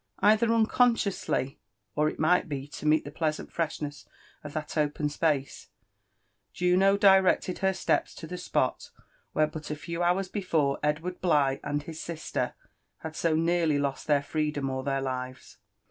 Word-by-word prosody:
Either 215 +3 +4
nneoihscfonsly, 225 - +1 0.4
or 150 +1 +2
H - - -8
nrright 175 +2 +2
be 140 -1 -4
to 150 - -5
meet 155 0 +3
the 145 - -7
pleasant 155 0 -2
fn^shnesrf 150 -3 -3 0.4
^ 150 +1 -4
thai 155 - 0
open 150 0 -1
space, 145 -2 -1 0.9
Jtino 190 +3 +3
directed 190 -2 +4
her 190 -1 +2
steps 190 - 0
to 165 - -8
the 180 +3 -6
spot - - -1 0.5
il^here 155 0 +2
but 155 -1 -7
a 150 - -2
tevf 170 +3 -4
hours 180 +2 +2
before 165 -8 0
Edward 155 +5 -2
Bligh 145 -6 +2
aild 145 0 -2
his 160 +1 -7
sister 165 -1 -3 0.5
had 160 -1 -6
so 165 -1 +1
nearly 165 -2 +2
lost 140 -1 -2
their 145 -2 +3
freedom 150 -2 -2
or 130 0 -3
their 135 0 -1
live». 130 -1 -5
155 Hz, 160 wpm, -28 LUFS, 145-180 Hz, 0.9 s, Either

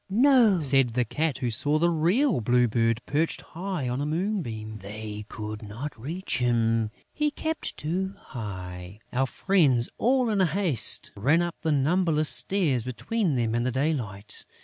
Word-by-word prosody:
"No," 235 -3 +5
said 135 -5 +4
the 125 -1 +2
Cat, 150 +5 -1
who 125 -3 -2
saw 145 +7 +1
the 170 +2 +2
real 175 - +2
Blue 125 +2 +3
Bird 115 +1 0
perched 155 +3 0
high 180 -4 -5
up 120 - -1
on 130 - -2
a - - -1
moonbeam.... 150 - -3
"They 105 +1 -7
could 110 -1 -6
not 115 +8 -7
reach 160 +11 -4
him, 115 -2 +1 0.2
he 300 -1 +1
kept 315 +2 -4
too 190 +5 -2
high...." 95 - -8 0.2
Our 135 +2 +1
friends 140 -10 +2
in - - -33
all 245 -2 +2
haste 175 - +2
ran 145 +12 +2
up 175 -1 -5
the 160 - 0
numberless 155 +2 +2
stairs 160 - +2
between 155 - -1
them 115 -2 0
and 120 0 0
the 130 - 0
daylight. 120 -8 -2
140 Hz, 165 wpm, -26 LUFS, 115-180 Hz, 0.2 s, No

